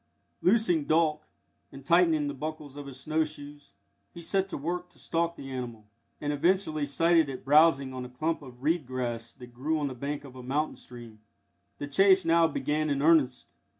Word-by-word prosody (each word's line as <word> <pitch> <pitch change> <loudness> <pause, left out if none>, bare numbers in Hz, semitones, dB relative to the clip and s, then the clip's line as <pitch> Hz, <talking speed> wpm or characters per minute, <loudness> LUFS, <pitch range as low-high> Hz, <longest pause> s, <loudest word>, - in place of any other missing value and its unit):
Loosing 180 -7 +2
Dolk, 155 -1 +2 0.5
and 135 -1 -12
tightening 165 -2 +3
the 145 - -3
buckles 150 0 -6
of 145 -1 -8
his 135 -1 -8
snow 155 +2 0
shoes, 145 -1 -10 0.4
he - - -8
set 190 +3 -1
to - - -4
work 175 +5 -4
to - - -21
stalk 170 0 -1
the 135 -3 -9
animal, 120 -4 -6 0.3
and 145 0 -2
eventually 155 -1 +1
sighted 165 +2 +3
it 130 -1 -7
browsing 140 -2 +4
on 130 -1 -5
a 125 - -8
clump 155 +7 -2
of 130 -2 -13
reed 155 -2 +1
grass 120 -3 -4
that 125 -1 -13
grew 150 +6 -1
on 145 -2 -1
the - - -6
bank 140 +4 -4
of 135 -2 -12
a 130 - -9
mountain 140 +5 -1
stream. 120 -3 -12 0.6
The - - -4
chase 190 +6 +4
now 165 0 +4
began 155 0 -1
in 140 0 0
earnest. 150 -6 +3
145 Hz, 190 wpm, -28 LUFS, 130-165 Hz, 0.6 s, browsing